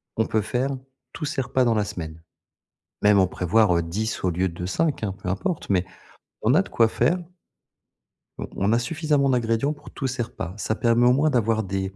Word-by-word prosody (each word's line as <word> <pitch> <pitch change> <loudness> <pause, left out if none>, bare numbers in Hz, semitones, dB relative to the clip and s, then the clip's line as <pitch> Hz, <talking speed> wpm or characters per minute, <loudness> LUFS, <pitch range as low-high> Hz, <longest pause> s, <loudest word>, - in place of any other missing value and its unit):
on 110 - +1
peut 110 - 0
faire, 125 +5 -1 0.4
tous 155 - -5
ses 145 -2 -1
repas 130 0 +1
dans 120 - +3
la 105 -1 +1
semaine. 80 -6 -7 0.8
Même 105 0 +5
en 95 - +5
prévoir, 90 +1 +2
heu, 85 - +1
10 105 +8 -3
au 90 - +3
lieu 90 +2 0
de 85 +1 -7
5, 150 - 0
hein, 100 - -1
peu - - -4
importe 120 - -2
mais 95 -2 +2 0.6
on 115 - +3
a 170 - +5
de - - -8
quoi 115 - +4
faire 170 +9 +1 1.2
on - - -5
on 100 +3 +1
a 115 - +3
suffisamment 150 +1 +1
d'ingrédients 120 +2 +1
pour 145 -1 -14
tous 135 - -3
ces 130 -1 -3
repas. 100 -7 -6
Ça 110 +1 -1
permet 120 +1 +3
au 125 - +6
moins 145 +4 +3
d'avoir 115 -4 +1
des 95 0 -3
110 Hz, 210 wpm, -24 LUFS, 95-130 Hz, 1.2 s, au